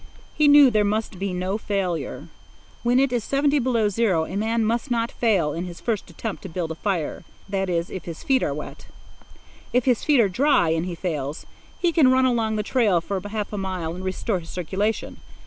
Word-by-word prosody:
He 300 - +3
knew 285 -2 +8
there 215 -1 +3
must 210 -2 -2
be 195 0 -2
no 185 +3 -2
failure. 195 -6 -3 0.5
When 245 +1 +3
it 270 -2 +2
is 240 -3 0
seventy 285 +3 +2
five - - -1
below 230 -4 +2
zero, 195 -6 +1
a 185 - -7
man 225 +2 0
must 235 +4 -1
not 235 -1 0
fail 190 -11 +1
in 170 +2 -3
his 175 -1 -8
first 220 -6 -2
attempt 205 +5 -5
to 190 - -8
build 165 -1 -3
a 160 - -8
fire—that 190 +1 -3
is, 170 -1 -1
if 185 - -6
his 165 -2 -7
feet 265 -1 +2
are - - 0
wet. - - -7 0.9
If 250 0 +2
his 250 -4 +2
feet 295 -4 +4
are 225 - +5
dry, 245 - +3
and 165 +2 0
he 175 - -4
fails, 155 -4 -4 0.3
he 345 - +1
can 315 -6 +5
run 260 0 +4
along 230 -3 +1
the 210 - -1
trail 215 -6 +2
for 190 +3 -4
half 210 0 -4
a 205 - -2
mile 185 -4 -3
and 185 +2 -7
restore 190 +2 -1
his 165 - -12
circulation. 195 +5 -2
205 Hz, 215 wpm, -24 LUFS, 180-240 Hz, 0.9 s, knew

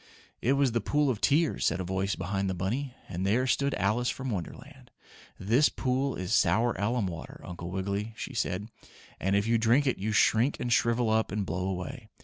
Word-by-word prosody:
"It 130 - +3
was 140 -2 +2
the 115 0 0
pool 145 +5 +2
of 110 - -5
tears," 155 +2 +2
said - - +1
a - - -2
voice 95 +2 -1
behind 95 +1 -2
the 95 - -2
bunny, 120 +9 -2
and 90 +1 -4
there 110 +7 +2
stood 140 +2 +1
Alice 120 +5 +1
from 130 -1 -3
Wonderland. 125 - -7 0.5
"This 115 +10 +3
pool 130 +1 -1
is 90 +2 -3
sour 115 +3 +3
alum 110 +2 0
water, 85 -3 -7
Uncle 90 -1 -7
Wiggily," 100 +4 -3
she 140 - -6
said, 105 -3 -2 0.5
"and 95 +2 +1
if 100 +1 +2
you 115 0 +2
drink 120 +6 +3
it 130 - 0
you 105 +3 -1
shrink 115 +5 +3
and 120 - 0
shrivel 115 -2 +2
up 110 -2 +1
and 100 0 -1
blow 90 +2 -2
away. 105 +5 -5
110 Hz, 200 wpm, -29 LUFS, 95-130 Hz, 0.5 s, It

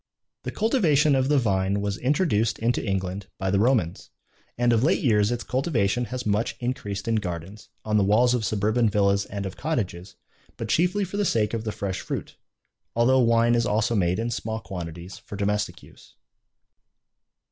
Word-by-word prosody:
The - - -3
cultivation 165 - +3
of 130 -1 +2
the 150 - +4
vine 100 -4 +1
was 100 -1 -2
introduced 125 - +1
into 120 +2 0
England 95 -1 -3
by 95 -1 -1
the 100 - +2
Romans, 110 -7 +1 0.5
and 120 0 +3
of 115 +1 +2
late 160 - +2
years 105 -4 +3
its 120 -1 -2
cultivation 125 -4 0
has 125 +1 -5
much 105 +2 0
increased 105 -5 -4
in 115 -1 +2
gardens, 90 +1 -6 0.2
on 105 0 +1
the 100 - +4
walls 115 +5 +4
of 120 -3 0
suburban 110 +3 +1
villas 100 -1 +2
and 100 0 -5
of 95 - -6
cottages, 100 - -3 0.4
but - - -5
chiefly 180 +5 +2
for 195 +2 -5
the 205 - +1
sake 110 - +1
of 115 -1 -3
the 110 - -1
fresh 100 -3 -4
fruit, - - -5 0.6
although 125 +3 +4
wine 115 -1 +4
is 115 -2 +2
also 110 +3 +1
made 90 -4 +1
in 115 +2 -2
small 110 -1 -3
quantities 90 -2 -8
for - - -9
domestic 100 -3 -2
use. - - -18
110 Hz, 180 wpm, -25 LUFS, 100-120 Hz, 0.6 s, the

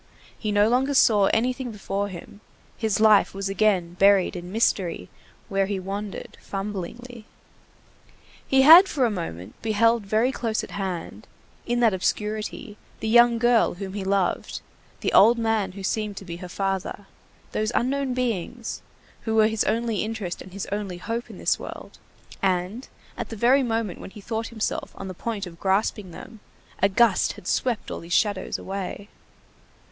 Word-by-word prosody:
He 215 - -3
no 205 +1 +4
longer 265 +4 +1
saw 210 -6 +5
anything 250 +2 0
before 200 -1 -3
him; 200 +2 -10 0.3
his 220 -3 -1
life 215 -3 +5
was 195 0 -3
again 195 -4 +1
buried 195 -2 +4
in 175 0 -7
mystery 185 - 0 0.4
where 195 0 0
he 200 -1 -2
wandered 200 +2 -6
fumblingly. 210 +4 -6 1.2
He 265 0 +4
had 335 +7 +10
for 270 -4 +1
a 230 - +1
moment 105 - -6
beheld 225 +1 +2
very 220 +5 +2
close 225 -4 -2
at - - -9
hand, 190 -4 -5 0.4
in 240 0 0
that 225 -4 +4
obscurity, 210 +2 -3 0.2
the 220 - -3
young 240 +1 +6
girl 240 -3 +3
whom 190 +1 -6
he 200 -1 -4
loved, 190 -2 -1 0.4
the - - -1
old 230 +4 +7
man 220 -4 0
who 195 0 -8
seemed 210 0 -2
to 195 - -7
be 170 -1 -6
her 180 0 -9
father, 195 +1 -3 0.5
those 215 +1 -1
unknown 265 +1 0
beings, 235 -1 -3 0.4
who 220 -1 0
were 220 -1 +6
his 220 -1 0
only 230 0 0
interest 215 -5 -4
and 185 - -11
his 195 +1 -5
only 200 -3 -3
hope 230 +6 -4
in - - -10
this - - +1
world; - - -9 0.4
and, 190 +6 -1 0.3
at - - -5
the 225 - -6
very 245 +6 +4
moment 225 -6 -2
when - - -8
he 210 - -12
thought 225 +2 -3
himself 220 -2 -3
on 195 - -6
the 185 - -6
point 210 +2 -4
of 170 -2 -11
grasping 195 0 0
them, 215 +6 -11 0.4
a 195 - +5
gust 215 0 +3
had 180 - -12
swept 245 -4 -1
all - - -4
these 170 - -12
shadows 200 +1 +1
away. 195 +1 -6
210 Hz, 170 wpm, -25 LUFS, 195-230 Hz, 1.2 s, had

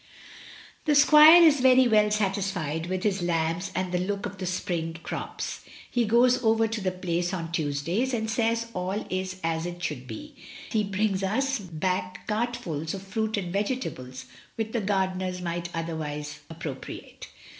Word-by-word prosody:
"The 300 - +3
squire 305 +4 +9
is 300 -4 +6
very 255 0 +6
well 210 -2 +4
satisfied 190 -6 -1
with 185 +1 -2
his 200 -3 +1
lambs 170 +2 -1
and 185 -1 -1
the 180 - +1
look 200 +2 -2
of 195 -2 -7
the 185 - -3
spring 170 -3 -2
crops. - - -5 0.3
He 240 -2 +2
goes 245 +3 +4
over 225 0 +3
to 225 -1 -4
the 190 - +1
Place 180 0 -2
on 165 -2 -5
Tuesdays, 170 - -1
and 220 -3 -1
says 230 0 +1
all 185 +3 -2
is 185 0 -3
as 165 +1 -1
it 175 0 -7
should 130 -6 -4
be. 300 - -8 0.4
He 220 -2 +2
brings 200 0 0
us 265 +7 0
back 185 0 -3
cartfuls 210 -8 -2
of 190 - -8
fruit 220 +2 -2
and 180 -3 -3
vege 210 +6 0
tables, 130 - -7 0.3
which 220 -1 -3
the 235 - -1
gardeners 190 -2 -1
might 175 -1 -3
otherwise 150 -3 -4
appro 160 -4 -5
priate. - - -10
190 Hz, 165 wpm, -27 LUFS, 170-220 Hz, 0.4 s, squire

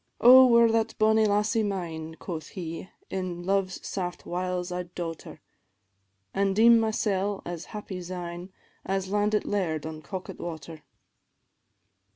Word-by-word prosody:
"Oh, 255 +2 +9
were 235 -1 +5
that 225 0 0
bonnie 220 0 +4
lassie 210 +2 +2
mine," 165 -6 -4
Quoth 160 -4 -6
he, 165 +1 -6 0.2
"in 180 -2 -4
love's 190 0 -1
saft 180 -2 -4
wiles 180 0 -3
I'd 180 0 -5
daut 165 -2 -4
her; - - -12 0.9
An' 195 0 +1
deem 230 +2 +7
mysel' 205 -3 0
as 170 -1 -5
happy 205 -4 -7
syne, 175 0 -6 0.3
As 195 -1 -2
landit 210 +1 +1
laird 165 -7 -1
on 155 -1 -6
Coquet 185 +5 -7
water. 160 -2 -7
185 Hz, 135 wpm, -27 LUFS, 175-210 Hz, 0.9 s, Oh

